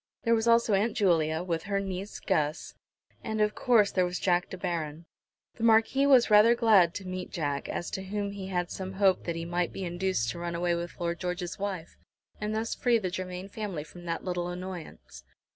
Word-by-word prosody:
There 230 - +3
was 225 0 +1
also 230 -2 +4
Aunt 210 +3 +1
Julia, 165 -4 +2
with 165 -3 -2
her 200 -1 +1
niece 195 +1 -5
Guss, 150 0 -1 0.5
and 220 -1 -3
of 210 0 +2
course, 225 -5 +3
there 185 - +2
was 180 0 -2
Jack 180 -1 +1
De - - -7
Baron. 165 -3 -3 0.5
The 230 - -6
Marquis 230 +5 +4
was 255 -5 +5
rather 215 +3 +7
glad 210 -8 +4
to 195 -2 -6
meet 185 0 -5
Jack, 145 -4 -2
as 175 - -4
to 190 - -4
whom 200 +1 -3
he 195 -1 -6
had 180 -2 -2
some 190 0 -5
hope 190 -1 +2
that 170 - -2
he 165 0 -4
might 175 0 -1
be 190 - -5
induced 175 -9 -1
to 170 - -7
run 170 0 -3
away 175 0 +1
with 170 +1 -5
Lord 170 -1 -2
George's 180 0 -4
wife, 190 -5 -4 0.4
and 215 0 -2
thus 225 +1 -1
free 240 -2 +2
the 190 -5 -3
Germain 185 0 -5
family 200 -7 -5
from 175 +3 -13
that 165 +1 -3
little 175 -1 -2
annoyance. 175 - -8
185 Hz, 210 wpm, -29 LUFS, 175-210 Hz, 0.5 s, rather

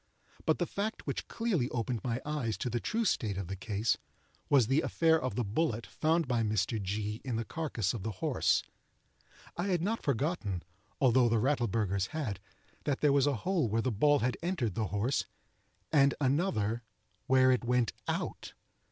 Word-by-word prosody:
But - - +4
the - - 0
fact 210 +2 -3
which - - -3
clearly 200 - 0
opened 120 -1 -2
my 120 -1 -1
eyes 145 -8 -2
to 125 - -3
the 120 - 0
true 225 - -1
state 105 - 0
of 100 - -3
the 95 +3 -5
case, 105 +3 0 0.5
was 135 -5 +5
the 135 +7 +2
affair 160 -1 +3
of 130 - -2
the 125 - 0
bullet, 115 +2 -1
found 160 0 +1
by 120 -2 +1
Mr. 110 0 0
G. 105 +3 -3
in 125 -4 -2
the 115 0 -2
carcass 120 - -2
of 115 - -4
the 110 +2 -3
horse. 90 - +1 0.9
I 175 +3 -2
had 175 -4 +1
not 225 +4 -1
forgotten, 135 - -1 0.4
although 125 -2 +5
the 115 - +3
Rattleburghers 110 -6 +1
had, 120 - -3 0.5
that 140 -2 0
there 145 -2 +4
was 140 0 +4
a 145 - +2
hole 175 - +2
where 115 +2 +1
the 130 - +1
ball 145 +8 +4
had 125 +1 0
entered 165 - -1
the 110 +2 -1
horse, 105 +8 0 0.7
and 140 -2 +5
another 130 - +1 0.5
where 130 0 +5
it 125 - +2
went 125 -1 +1
out. - - -3
125 Hz, 180 wpm, -31 LUFS, 110-150 Hz, 0.9 s, was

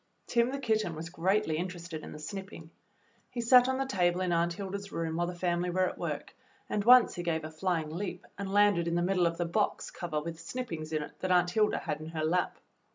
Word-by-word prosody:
Tim, 235 0 +2
the 275 - -3
kitten, 220 -9 0
was 165 +1 -6
greatly 185 -1 +1
interested 170 -2 -5
in - - -9
the - - -8
snipping. 170 0 -8 0.6
He 245 - -6
sat 245 +1 +6
on 260 0 0
the 270 - 0
table 180 -6 +1
in 180 -1 0
Aunt 170 0 +2
Hilda's 200 +2 -6
room 165 -1 -2
while 175 +1 0
the 180 - -5
family 175 0 0
were 185 +1 +2
at - - -6
work, - - -4 0.3
and 205 - -1
once 250 +2 +7
he 175 - -4
gave 165 -2 -1
a 155 - -6
flying 160 -1 -1
leap 185 +4 -5
and 200 -1 -5
landed 205 -4 +4
in 170 - 0
the 175 - +2
middle 180 -1 +3
of 165 0 -3
the 175 - 0
box 170 - -1
cover 170 -3 -3
with 165 +1 -6
snippings 165 -5 -5
in 155 -1 0
it - - -12
that 185 - -2
Aunt 180 -1 +4
Hilda 210 +2 +2
had 150 -1 -3
in 155 - -7
her 160 -1 -2
lap. 180 +3 0
175 Hz, 235 wpm, -30 LUFS, 165-200 Hz, 0.6 s, once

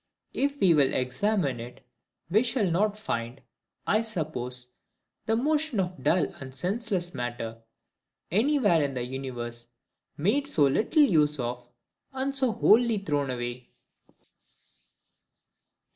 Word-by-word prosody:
If 280 +1 -1
we 180 -3 +5
will 140 -4 +3
examine 135 - 0
it, 120 +2 -10 0.5
we 210 +4 +5
shall 235 -6 +1
not 205 +4 +1
find, 120 - -4 0.5
I 215 - +2
suppose, 130 - -2 0.6
the 225 - +2
motion 295 -1 0
of 180 -1 -3
dull 175 -2 +3
and 130 -1 -9
senseless 190 - -1
matter, 120 -3 -5 0.7
any 255 - +3
where 205 - +3
in 140 -2 -1
the 125 - -2
universe, 120 -2 -6 0.5
made 235 - +1
so 165 - +2
little 220 - +3
use 150 - +3
of 120 0 -4 0.4
and 270 +1 -2
so 260 -3 +2
wholly 230 +1 +4
thrown 145 -8 -1
away. 120 0 -5
170 Hz, 125 wpm, -27 LUFS, -, 0.7 s, we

